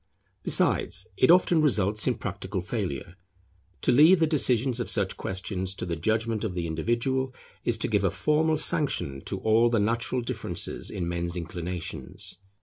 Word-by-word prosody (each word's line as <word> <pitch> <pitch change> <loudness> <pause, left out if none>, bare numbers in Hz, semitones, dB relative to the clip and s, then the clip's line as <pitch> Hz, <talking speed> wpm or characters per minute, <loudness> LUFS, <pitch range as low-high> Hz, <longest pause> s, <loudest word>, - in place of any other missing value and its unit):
Besides, - - +2
it 130 - +3
often 175 -2 +5
results 105 -7 +2
in 125 - +2
practical 95 -1 -5
failure. 90 - -4 0.6
To - - +2
leave 155 +8 +6
the 165 - +4
decision 130 -5 +2
of 120 - -2
such 100 -3 -1
questions 95 0 -4
to - - -3
the 85 -2 -2
judgment 110 +6 -1
of 100 -5 -3
the 85 -1 -2
individual, 120 - -1 0.3
is 115 - 0
to - - -1
give 105 -3 +1
a 100 - +3
formal 155 - +1
sanction 70 - 0
to 95 - -3
all 115 +2 +4
the 115 - +1
natural 115 +4 0
difference 120 - -2
in 90 -3 -4
men's 85 0 -2
inclinations. 90 +2 -5
110 Hz, 160 wpm, -27 LUFS, 90-130 Hz, 0.6 s, leave